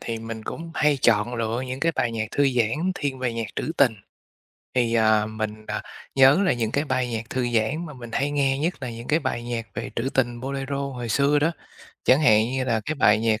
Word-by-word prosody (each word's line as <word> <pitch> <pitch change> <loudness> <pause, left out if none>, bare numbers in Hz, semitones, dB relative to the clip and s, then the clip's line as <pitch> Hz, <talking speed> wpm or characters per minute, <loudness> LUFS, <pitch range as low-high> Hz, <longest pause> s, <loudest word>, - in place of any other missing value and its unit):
thì 115 -1 -4
mình 115 0 -7
cũng 165 +7 -6
hay 150 -2 +3
chọn 120 -1 +2
lựa 115 0 -1
những 130 +2 -5
cái 165 0 +2
bài 120 -5 0
nhạc 110 -1 -2
thư 145 -1 +2
giãn 125 +9 0
thiên 140 -5 -3
về 125 -2 -1
nhạc 115 -1 -3
trữ 160 - -2
tình. 135 -5 +5 0.8
Thì, 120 -2 +2
à, 110 -1 +4
mình, 110 0 -5
à, - - -3 0.3
nhớ 135 +5 +6
là 185 - +3
những 115 -2 -2
cái 145 - +1
bài 130 -3 0
nhạc 115 0 -4
thư 125 -1 -1
giãn 120 +10 0
mà 150 - -8
mình 120 -4 -10
hay 140 +4 0
nghe 135 -2 +1
nhất 165 +5 0
là 125 - -3
những 115 +1 -9
cái 155 - +3
bài 130 -6 -3
nhạc 120 -1 -4
về - - -4
trữ 120 +3 0
tình 120 -2 0
bolero 135 +1 -3
hồi 130 -4 -4
xưa 140 +6 +3
đó, 155 +3 +2 0.5
chẳng 130 +3 +5
hạn 110 -8 +5
như 130 0 -1
là 115 -3 +1
cái 155 - -2
bài 110 -7 +4
nhạc, 110 -1 +1
125 Hz, 235 wpm, -24 LUFS, 115-140 Hz, 0.8 s, nhớ